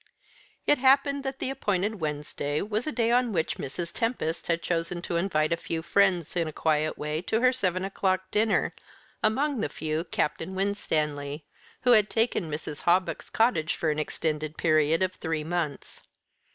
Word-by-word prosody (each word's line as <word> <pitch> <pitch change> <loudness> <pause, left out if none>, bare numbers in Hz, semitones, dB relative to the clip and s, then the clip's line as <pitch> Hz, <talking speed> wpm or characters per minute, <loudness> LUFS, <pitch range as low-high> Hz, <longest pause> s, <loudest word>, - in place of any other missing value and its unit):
It 295 - +4
happened 275 +1 +4
that 270 0 -3
the 265 - -2
appointed 205 -4 -1
Wednesday 150 -1 -2
was 215 +5 -2
a - - 0
day 235 -4 +1
on 245 -1 +3
which 160 -3 0
Mrs. 170 +5 -5
Tempest 225 -9 -2
had 170 0 0
chosen 170 0 -1
to 170 - -3
invite 170 -3 +1
a - - 0
few 165 -1 -4
friends 180 -3 +2
in 170 -2 +1
a - - -4
quiet 155 0 0
way 150 +1 -2
to 220 +4 0
her 255 0 +5
seven 185 -6 0
o'clock 190 -1 -1
dinner; 215 +1 +2 0.5
among 270 +5 +1
the 150 - -1
few 155 +2 -2
Captain 170 +2 -2
Winstanley, 150 -7 -1 0.4
who 250 - +4
had 215 -3 +5
taken 225 -7 0
Mrs. 150 -1 -5
Hawbuck's 180 +2 +1
cottage 220 -9 +2
for 160 - 0
an 150 - -2
extended 155 0 -2
period 155 +1 +3
of 185 0 0
three 160 -3 -3
months. 160 -3 -3
175 Hz, 170 wpm, -27 LUFS, 155-215 Hz, 0.5 s, her